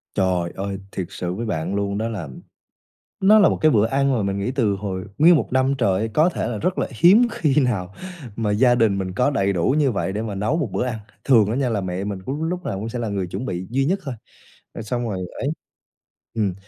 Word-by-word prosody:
Trời 90 Hz, -3 st, +1 dB
ơi, 100 Hz, 0 st, -4 dB
thiệt 90 Hz, -3 st, -3 dB
sự 90 Hz, 0 st, -4 dB
với 115 Hz, +3 st, -4 dB
bạn 90 Hz, -1 st, -2 dB
luôn 100 Hz, 0 st, -1 dB
đó 110 Hz, +1 st, -1 dB
là 95 Hz, -10 st, -5 dB, 0.9 s
nó 210 Hz, +3 st, +7 dB
là 200 Hz, -, +6 dB
một -, -, -1 dB
cái 155 Hz, -1 st, +5 dB
bữa 105 Hz, -2 st, +4 dB
ăn 135 Hz, +3 st, +1 dB
mà 115 Hz, -5 st, 0 dB
mình 100 Hz, 0 st, -1 dB
nghĩ 100 Hz, +6 st, -1 dB
từ 115 Hz, -7 st, +1 dB
hồi 95 Hz, -2 st, -4 dB
nguyên 170 Hz, +4 st, +7 dB
1 150 Hz, -, 0 dB
năm 130 Hz, +1 st, +2 dB
trời, 110 Hz, -2 st, +1 dB
có 160 Hz, +4 st, +4 dB
thể 170 Hz, -, -3 dB
là 115 Hz, -2 st, -3 dB
rất 180 Hz, -, -1 dB
là -, -, 0 dB
hiếm 185 Hz, -, +5 dB
khi 150 Hz, -9 st, 0 dB
nào 100 Hz, -7 st, -1 dB, 0.4 s
mà 110 Hz, -2 st, -1 dB
gia 120 Hz, +4 st, +4 dB
đình 110 Hz, -5 st, +2 dB
mình 95 Hz, -1 st, -3 dB
có 125 Hz, +8 st, +2 dB
đầy 100 Hz, -8 st, +1 dB
đủ 90 Hz, +10 st, +1 dB
như 145 Hz, -4 st, +3 dB
vậy 95 Hz, -2 st, -2 dB
để 105 Hz, -, -2 dB
mà 110 Hz, -3 st, -4 dB
nấu 105 Hz, +11 st, 0 dB
1 150 Hz, -9 st, -1 dB
bữa 125 Hz, -, -1 dB
ăn. 110 Hz, -3 st, -3 dB, 0.2 s
Thường 110 Hz, -6 st, +4 dB
á -, -, -1 dB
nha 135 Hz, -1 st, 0 dB
là 105 Hz, -4 st, -1 dB
mẹ 90 Hz, +1 st, -3 dB
mình 100 Hz, -1 st, -4 dB
cứ 135 Hz, -, -2 dB, 0.2 s
lúc 180 Hz, 0 st, -4 dB
nào 95 Hz, -, -3 dB
cũng 110 Hz, +3 st, -4 dB
sẽ 120 Hz, +1 st, -4 dB
là 115 Hz, -, -2 dB
người 95 Hz, -2 st, -2 dB
chuẩn 110 Hz, +8 st, -5 dB
bị 90 Hz, -2 st, -4 dB
duy 135 Hz, +3 st, +1 dB
nhất 190 Hz, +6 st, +1 dB
thôi, 135 Hz, -4 st, -4 dB, 0.6 s
rồi 115 Hz, -, -6 dB
xong 120 Hz, +1 st, -2 dB
rồi 95 Hz, -, -3 dB, 0.2 s
ấy 135 Hz, -, -2 dB, 0.9 s
ừm, 105 Hz, -5 st, 0 dB
110 Hz, 250 wpm, -22 LUFS, 100-135 Hz, 0.9 s, nó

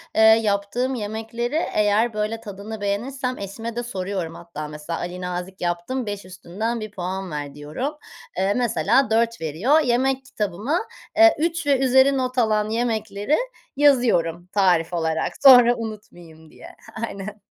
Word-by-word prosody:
eee, -, -, +4 dB
yaptığım 220 Hz, +3 st, +3 dB
yemekleri 225 Hz, +4 st, -4 dB, 0.2 s
eğer 210 Hz, +2 st, +2 dB
böyle 215 Hz, +2 st, -2 dB
tadını 210 Hz, 0 st, -8 dB
beğenirsem 250 Hz, +6 st, -2 dB
eşime 225 Hz, +4 st, -6 dB
de 240 Hz, -, -2 dB
soruyorum. 185 Hz, -6 st, -4 dB
Hatta, 170 Hz, -3 st, -7 dB
mesela, 150 Hz, +2 st, -6 dB
Ali 180 Hz, +1 st, -5 dB
Nazik 180 Hz, +1 st, -5 dB
yaptım, 175 Hz, +9 st, -2 dB
5 205 Hz, -2 st, -5 dB
üstünden 195 Hz, +6 st, -4 dB
bir 215 Hz, -1 st, -6 dB
puan 185 Hz, -1 st, -5 dB
ver 145 Hz, -1 st, -5 dB
diyorum. 150 Hz, -, -4 dB, 0.4 s
Eee, 190 Hz, +2 st, +2 dB
mesela 240 Hz, -, +2 dB
4 230 Hz, -1 st, +1 dB
veriyor. 180 Hz, -, +2 dB
Yemek 260 Hz, +1 st, +1 dB
kitabıma, 215 Hz, -, -2 dB, 0.4 s
eee, 335 Hz, 0 st, +7 dB
3 330 Hz, 0 st, -1 dB
ve 275 Hz, -2 st, +3 dB
üzeri 265 Hz, +1 st, +4 dB
not 255 Hz, 0 st, -2 dB
alan 215 Hz, -3 st, +2 dB
yemekleri 220 Hz, +1 st, 0 dB, 0.4 s
yazıyorum 230 Hz, -, +2 dB
tarif 180 Hz, -4 st, +2 dB
olarak. 160 Hz, -1 st, -1 dB
Sonra 245 Hz, -3 st, +8 dB
unutmayayım 175 Hz, -8 st, -9 dB
diye. -, -, -13 dB, 0.3 s
Aynen. 205 Hz, +1 st, -8 dB
215 Hz, 140 wpm, -23 LUFS, 180-245 Hz, 0.4 s, Sonra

